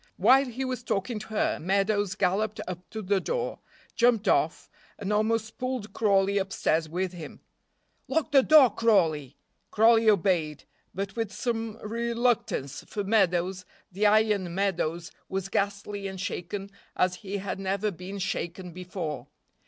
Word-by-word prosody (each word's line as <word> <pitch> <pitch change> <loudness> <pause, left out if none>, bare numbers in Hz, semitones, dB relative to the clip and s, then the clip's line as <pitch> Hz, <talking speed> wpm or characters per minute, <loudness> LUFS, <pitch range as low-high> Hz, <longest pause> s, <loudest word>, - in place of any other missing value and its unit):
While 270 +1 +5
he 255 +2 -4
was 255 -2 -3
talking 215 0 -2
to 215 - -9
her 220 -1 0
Meadows 200 +2 +1
galloped 205 +3 0
up 180 0 -7
to 220 -1 -6
the 195 +1 +2
door, - - -2 0.3
jumped 235 -3 +3
off, - - +1 0.3
and 205 0 -2
almost 220 +2 0
pulled 255 -4 -3
Crawley 200 -2 +2
upstairs 165 -4 0
with 180 +2 -2
him. 165 -4 -9 0.7
"Lock 315 -1 0
the 275 -2 +7
door, 280 -4 +7
Crawley." 160 - +2 0.3
Crawley 225 0 +5
obeyed, 170 -7 +1 0.3
but 195 +1 -4
with 225 -3 -2
some 225 -1 -3
reluctance, 235 - -1
for 205 - -3
Meadows, 185 -3 +1 0.3
the 205 +3 +2
iron 205 -4 +2
Meadows, 175 -4 -1 0.2
was 195 0 -3
ghastly 200 0 -2
and 190 -1 -7
shaken 195 +1 -4 0.2
as 180 0 +1
he 200 -2 -5
had 195 0 -4
never 195 +2 -1
been 185 +3 -8
shaken 180 -1 -4
before. 175 -4 -5
200 Hz, 145 wpm, -27 LUFS, 185-225 Hz, 0.7 s, the